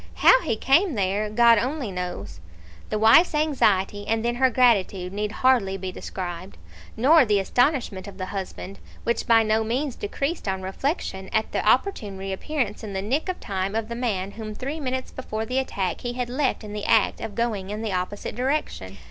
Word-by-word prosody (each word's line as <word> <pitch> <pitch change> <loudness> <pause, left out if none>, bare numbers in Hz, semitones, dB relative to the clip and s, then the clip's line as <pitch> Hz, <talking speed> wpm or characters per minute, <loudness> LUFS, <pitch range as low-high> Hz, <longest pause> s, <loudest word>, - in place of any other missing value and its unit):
How - - +6
he 225 - -1
came 280 - +3
there, 200 +1 0
God 230 +1 +5
only 255 -1 -2
knows." 180 - -5 0.5
The 215 - -1
wife's 225 +11 +6
anxiety, 205 -10 +1
and 225 0 0
then 240 - +1
her 260 +1 +4
gratitude, 200 -7 +2
need 210 +1 -2
hardly 225 -6 +2
be 190 -1 -5
described, 180 0 -6 0.4
nor 295 +7 +6
the 210 -4 +2
astonishment 240 -3 0
of 195 -1 -10
the 185 - -3
husband, 195 0 -6 0.2
which 235 - -1
by 225 -1 +6
no 220 +1 +1
means 250 +4 -2
decreased 275 +7 -3
on 190 -1 -2
reflection, 190 - -3
at 220 0 0
the - - -1
opportune 220 - +1
re 195 0 -4
appearance 240 -1 -3
in 210 -2 -6
the 190 - -2
nick 275 - -1
of 370 - -3
time 195 +1 -3
of 225 0 -2
the 235 - -4
man 200 -6 -2
whom 215 0 -7
three 275 +7 -4
minutes 260 -2 -3
before 220 -4 -4
the 255 +4 0
attack 190 -9 -2
he 245 0 -3
had 245 -1 -3
left 260 -2 -1
in 210 -1 -8
the 210 -1 -4
act - - +3
of 205 - -6
going 220 -5 -2
in 210 +2 -4
the 215 -3 -2
opposite 185 +3 -3
direction. 245 - -2
220 Hz, 195 wpm, -24 LUFS, 195-255 Hz, 0.5 s, How